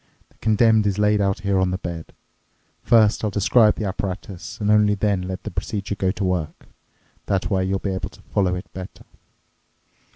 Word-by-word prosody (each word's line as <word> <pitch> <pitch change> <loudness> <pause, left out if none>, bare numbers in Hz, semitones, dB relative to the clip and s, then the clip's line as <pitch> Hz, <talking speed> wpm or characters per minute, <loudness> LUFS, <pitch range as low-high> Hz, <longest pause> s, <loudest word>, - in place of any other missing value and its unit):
The - - -30
condemned 110 -1 +3
is 100 -1 0
laid 105 0 +3
out 95 -1 0
here 100 -1 +1
on 95 0 +2
the 90 - -2
bed. 85 -3 -7 0.7
First, 110 -3 +4
I'll 105 - +1
describe 105 +2 +4
the 110 - -3
apparatus 95 -2 -5
and 105 -1 +1
only 105 -1 +4
then 100 -2 0
let 95 0 -5
the - - -5
procedure 100 -1 -3
go 95 -2 -1
to 95 +2 -2
work. 90 -4 -2 0.6
That 95 +1 -1
way 95 -1 +1
you'll 95 +1 0
be 95 0 -3
able 95 - -4
to - - -18
follow 90 -2 0
it 90 - -6
better. 95 0 -9
100 Hz, 190 wpm, -22 LUFS, 95-105 Hz, 0.7 s, First